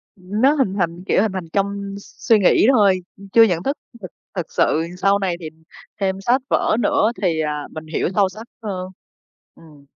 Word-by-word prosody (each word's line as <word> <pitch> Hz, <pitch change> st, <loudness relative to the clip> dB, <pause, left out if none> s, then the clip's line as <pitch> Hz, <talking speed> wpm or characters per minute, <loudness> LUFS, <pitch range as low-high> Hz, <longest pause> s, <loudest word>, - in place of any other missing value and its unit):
Ừm, 195 Hz, +3 st, -5 dB
nó 270 Hz, +3 st, +6 dB
hình 265 Hz, -10 st, 0 dB
thành, 175 Hz, -2 st, -2 dB
kiểu, -, -, +3 dB
hình 215 Hz, -2 st, 0 dB
thành 180 Hz, -4 st, -6 dB
trong 200 Hz, 0 st, -2 dB
s -, -, -17 dB
suy 220 Hz, -2 st, +7 dB
nghĩ 200 Hz, +3 st, +4 dB
thôi, 200 Hz, -6 st, +4 dB, 0.2 s
ưm, 200 Hz, 0 st, -13 dB
chưa 230 Hz, +3 st, +7 dB
nhận 175 Hz, -5 st, +1 dB
thức 275 Hz, +6 st, -1 dB, 0.2 s
thực 185 Hz, -, -8 dB, 0.2 s
thực 180 Hz, -4 st, -4 dB
sự. 160 Hz, +2 st, +1 dB
Sau 195 Hz, +2 st, +2 dB
này 190 Hz, -3 st, -1 dB
thì 160 Hz, -2 st, -6 dB, 0.5 s
thêm 190 Hz, 0 st, -1 dB
sách 245 Hz, +5 st, +2 dB
vở 215 Hz, -, +2 dB
nữa 220 Hz, 0 st, +2 dB
thì, 165 Hz, -4 st, +1 dB
à, 150 Hz, -1 st, -3 dB
mình 155 Hz, 0 st, -8 dB
hiểu 165 Hz, -, -1 dB
sâu 200 Hz, -2 st, +3 dB
sắc 220 Hz, +5 st, -11 dB, 0.2 s
hơn. 185 Hz, -3 st, -4 dB, 0.7 s
Ừm. 150 Hz, -3 st, -18 dB
195 Hz, 205 wpm, -20 LUFS, 175-210 Hz, 0.7 s, suy